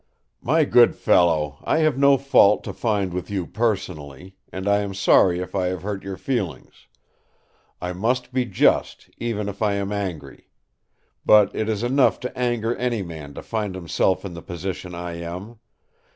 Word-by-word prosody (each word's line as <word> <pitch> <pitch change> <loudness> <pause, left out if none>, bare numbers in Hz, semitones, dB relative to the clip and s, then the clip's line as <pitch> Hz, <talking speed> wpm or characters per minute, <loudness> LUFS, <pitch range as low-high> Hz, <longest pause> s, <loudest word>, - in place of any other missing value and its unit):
"My - - +2
good - - +5
fellow, 75 -5 +2
I - - +1
have 155 - +2
no 140 0 +5
fault 115 -7 +4
to - - -6
find 100 -6 -1
with 90 0 -4
you 95 -3 -2
personally; 95 - -3 0.2
and 95 +1 -5
I 100 0 +4
am 100 -1 -4
sorry 95 -2 +4
if 90 0 -6
I 95 -2 0
have 90 -1 -4
hurt 100 -1 -4
your 95 -1 -6
feelings. 100 - -4 0.9
I 90 0 -4
must 125 +7 -1
be 130 -1 +1
just, 95 - +1
even 110 -3 -2
if 100 +1 -7
I 105 -2 +2
am 100 0 -3
angry. 90 -9 -5 0.8
But 105 -2 +5
it 110 - -1
is 110 0 -1
enough 130 +2 +3
to 125 - -5
anger 120 -2 -1
any 120 -4 -1
man 80 -5 -9
to - - -8
find 105 -4 -3
himself 95 +1 0
in 95 - -6
the 85 - -8
position 90 0 -6
I 85 -1 -6
am. 90 +7 -7
100 Hz, 175 wpm, -23 LUFS, 90-110 Hz, 0.9 s, good